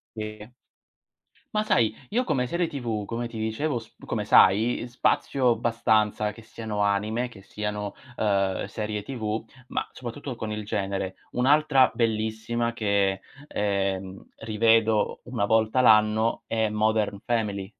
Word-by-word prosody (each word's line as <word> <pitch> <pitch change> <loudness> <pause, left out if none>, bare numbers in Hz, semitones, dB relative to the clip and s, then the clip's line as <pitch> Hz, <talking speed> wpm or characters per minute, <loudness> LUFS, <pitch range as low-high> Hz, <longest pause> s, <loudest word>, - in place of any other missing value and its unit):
Sì. 110 -1 -6 1.1
Ma 215 - +2
sai, 120 - +2
io 250 +3 +1
come 125 - +1
serie 170 +6 0
TV, 115 -8 -3
come 120 +2 -4
ti 115 - -8
dicevo 120 +5 -1
sp 115 - -18
come - - -2
sai, 110 +6 +5
spazio 125 +1 +2
abbastanza 110 -2 +1
che 115 - -13
siano 110 -2 -5
anime, 105 +4 0
che 100 -4 -14
siano, 105 0 -4 0.2
uhm 100 -3 +1
serie 105 0 -4
TV, 110 -2 -4 0.2
ma - - -2
soprattutto 125 +1 -6
con 110 -1 -5
il 105 -1 -4
genere. 95 -2 -2 0.2
Un'altra 135 +1 +4
bellissima 115 +1 -1
che, 100 -3 +1 0.3
ehm, 95 -3 -2
rivedo 110 -1 +2
una 120 -4 -1
volta 110 +3 +2
l'anno 110 -1 +4
è 110 -1 +1
Modern 105 -1 0
Family 105 -4 -1
110 Hz, 130 wpm, -26 LUFS, 105-120 Hz, 1.1 s, sai